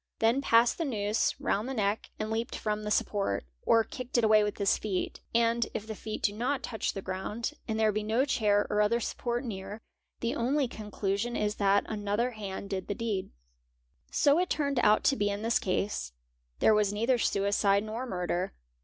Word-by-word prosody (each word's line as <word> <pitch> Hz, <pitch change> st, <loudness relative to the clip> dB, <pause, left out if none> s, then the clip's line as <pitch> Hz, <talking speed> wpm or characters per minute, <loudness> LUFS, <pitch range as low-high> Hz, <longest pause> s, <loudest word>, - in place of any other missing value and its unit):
then 230 Hz, +5 st, +3 dB
passed 230 Hz, 0 st, +4 dB
the -, -, +1 dB
noose 215 Hz, -6 st, 0 dB
round 215 Hz, +6 st, -1 dB
the 270 Hz, -, -3 dB
neck 205 Hz, -1 st, -1 dB
and 215 Hz, 0 st, -3 dB
leaped 225 Hz, +2 st, -2 dB
from 215 Hz, -1 st, -2 dB
he 210 Hz, -, -3 dB
support, 200 Hz, -, 0 dB, 0.2 s
or 225 Hz, 0 st, +5 dB
kicked 250 Hz, +2 st, -4 dB
it 240 Hz, -, +3 dB
away 215 Hz, -1 st, +6 dB
with 210 Hz, -1 st, -2 dB
his 200 Hz, -2 st, +3 dB
feet; 195 Hz, -4 st, -3 dB, 0.2 s
and 235 Hz, 0 st, +3 dB
if 210 Hz, -, -3 dB
the 220 Hz, -, -5 dB
feet 215 Hz, +1 st, -6 dB
do 205 Hz, -, +2 dB
not 255 Hz, +3 st, -2 dB
ouch 220 Hz, -, -1 dB
the 195 Hz, -, -6 dB
ground 210 Hz, +8 st, -3 dB
and 220 Hz, -1 st, -1 dB
there 220 Hz, -1 st, +4 dB
be 215 Hz, +1 st, -1 dB
no 225 Hz, +5 st, +1 dB
chair 210 Hz, -7 st, +2 dB
or 210 Hz, -, +3 dB
other 220 Hz, +3 st, +2 dB
support 240 Hz, +2 st, -2 dB
near, 200 Hz, -1 st, -6 dB, 0.4 s
the 235 Hz, 0 st, -1 dB
only 265 Hz, +4 st, +1 dB
¢ 215 Hz, -3 st, -9 dB
clusion 205 Hz, +5 st, -1 dB
is 210 Hz, 0 st, -1 dB
that 200 Hz, 0 st, +3 dB
another 210 Hz, +3 st, -1 dB
hand 200 Hz, -3 st, -6 dB
did 190 Hz, -1 st, -3 dB
the 205 Hz, -, -2 dB
deed. 210 Hz, -4 st, -2 dB, 0.8 s
So 290 Hz, +3 st, +4 dB
it 360 Hz, -, 0 dB
turned 280 Hz, -3 st, 0 dB
out 210 Hz, -2 st, +4 dB
to 275 Hz, -, +4 dB
be 205 Hz, -4 st, +1 dB
in 205 Hz, +1 st, -3 dB
this 230 Hz, +1 st, +2 dB
case. 185 Hz, -, -2 dB, 0.4 s
There 220 Hz, -, +5 dB
was 210 Hz, -2 st, +3 dB
neither 230 Hz, +4 st, +1 dB
suicide 200 Hz, -1 st, +2 dB
nor 225 Hz, +4 st, -4 dB
murder. 180 Hz, -2 st, -2 dB
215 Hz, 200 wpm, -29 LUFS, 205-235 Hz, 0.8 s, away